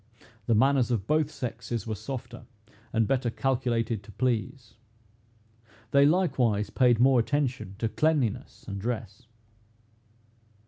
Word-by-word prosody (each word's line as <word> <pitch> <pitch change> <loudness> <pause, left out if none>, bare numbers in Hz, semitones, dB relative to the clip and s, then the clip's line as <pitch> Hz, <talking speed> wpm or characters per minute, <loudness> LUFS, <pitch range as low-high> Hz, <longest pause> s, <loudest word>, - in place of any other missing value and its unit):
The 115 - +3
manners 130 +2 +3
of 110 -6 -1
both 155 +3 +1
sexes 120 -5 -5
were 110 - -3
softer, 120 +1 -7 0.4
and 115 -2 +1
better 130 -3 +1
calculated 115 -2 -1
to 100 - -14
please. 125 +1 -2 1.2
They 140 0 +6
likewise 125 - +1
paid 125 -3 +3
more 130 0 +5
attention 125 -6 -1
to 115 - -1
cleanliness 130 -3 -1
and 100 -2 -5
dress. 115 0 -5
120 Hz, 120 wpm, -27 LUFS, 110-135 Hz, 1.2 s, They